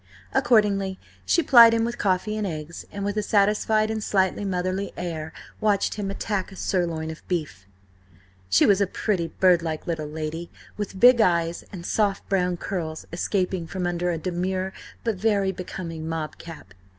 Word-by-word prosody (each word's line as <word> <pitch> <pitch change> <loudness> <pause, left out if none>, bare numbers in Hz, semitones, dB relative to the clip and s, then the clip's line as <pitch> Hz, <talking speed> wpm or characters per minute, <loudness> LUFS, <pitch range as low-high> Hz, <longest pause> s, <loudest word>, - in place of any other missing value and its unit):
Accordingly 200 -5 +2 0.3
she 340 - +3
plied 235 -4 +8
him 225 0 +1
with 235 +1 -4
coffee 200 +2 0
and 215 -2 -1
eggs, 160 -1 -6
and 200 0 -4
with 205 +1 -2
a - - +1
satisfied 215 +1 +2
and 220 -1 -3
slightly 190 0 +1
motherly 185 +1 -2
air, 160 -3 -4 0.3
watched 205 -2 +1
him 205 -2 -3
attack 195 -1 -3
a - - -11
sirloin 170 -5 -1
of 160 - -10
beef. 150 - -3 0.8
She 95 - +5
was 200 -1 +4
a 200 - +3
pretty, 185 -3 -1
birdlike 170 -4 +2
little 160 -4 -3
lady, 160 +2 -5 0.3
with 200 -2 -5
big 245 0 +7
eyes, 170 -4 +1
and 175 -3 -8
soft 200 -1 0
brown 180 -2 +1
curls 165 -4 -4
escaping 180 -1 -1
from 180 +1 -3
under 175 0 -1
a 170 - -1
demure 185 +2 -2 0.3
but 225 -4 -1
very 200 -2 +1
becoming 170 -3 -6
mob 160 -2 -4
cap. 165 -1 -11
185 Hz, 165 wpm, -25 LUFS, 170-205 Hz, 0.8 s, plied